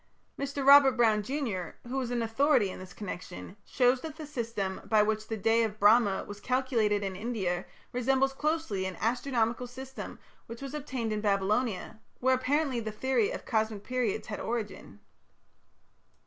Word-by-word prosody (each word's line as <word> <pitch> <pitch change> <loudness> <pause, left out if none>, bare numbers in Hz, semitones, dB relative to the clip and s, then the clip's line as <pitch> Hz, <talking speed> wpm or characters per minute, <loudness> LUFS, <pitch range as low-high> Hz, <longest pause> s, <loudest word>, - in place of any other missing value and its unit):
Mr. 280 0 -3
Robert 280 -1 +9
Brown, 225 -4 +3
junr., 215 - -3
who 265 +2 -1
is 245 - -3
an 240 -1 0
authority 225 -2 +3
in - - -8
this 185 -1 -10
connection, 180 -1 -7
shows 250 0 +2
that 315 -2 -6
the 315 -1 -7
system 230 -9 -3
by 215 -2 +4
which 215 0 -1
the 220 - -3
"Day 225 +3 +3
of 215 -2 -2
Brahma" 205 -1 +5
was 205 -1 -8
calculated 230 -5 +1
in 190 -1 -3
India 190 -5 -2 0.3
resembles 265 +2 +2
closely 295 -10 -1
an 185 -2 -6
astronomical 245 0 0
system 265 +2 -8 0.3
which 230 +3 -8
obtained 265 -5 -3
in 210 - -2
Babylonia, 210 +1 0 0.2
where 260 +1 +3
apparently 265 0 +1
the 220 -1 -4
theory 265 - +1
of - - -6
cosmic 220 -3 -1
periods 250 -4 -1
had 210 - -5
origin. 210 - -5
230 Hz, 160 wpm, -30 LUFS, 210-265 Hz, 0.3 s, Robert